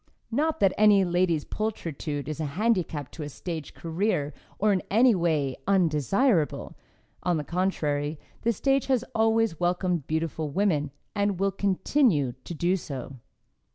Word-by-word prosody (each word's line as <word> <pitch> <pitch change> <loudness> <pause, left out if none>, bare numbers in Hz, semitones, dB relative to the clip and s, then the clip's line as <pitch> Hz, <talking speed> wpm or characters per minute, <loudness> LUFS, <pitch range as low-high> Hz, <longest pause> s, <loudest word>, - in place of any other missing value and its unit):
Not 305 +6 0
that 195 -2 +4
any 205 -2 +6
lady's 175 -3 +1
pulchritude 155 - -4
is 155 0 -4
a 155 - -1
handicap 180 - 0
to 160 - -9
a 150 - -4
stage 160 +1 -6
career 165 -3 -1 0.2
or 210 0 +3
in 185 - +1
any 235 +4 +5
way 155 -7 0
undesirable. 180 - +2 0.5
On 175 -2 +1
the 150 - -2
contrary, 150 -4 -1 0.2
the 235 - +2
stage 270 +4 +1
has 255 -2 +1
always 225 -5 +2
welcomed 175 -3 0
beautiful 160 -1 -2
women, 155 -4 +1 0.2
and 200 -3 0
will 195 0 +2
continue 190 - +2
to - - -5
do 175 +4 +1
so. 135 -5 -7
180 Hz, 145 wpm, -27 LUFS, 155-205 Hz, 0.5 s, any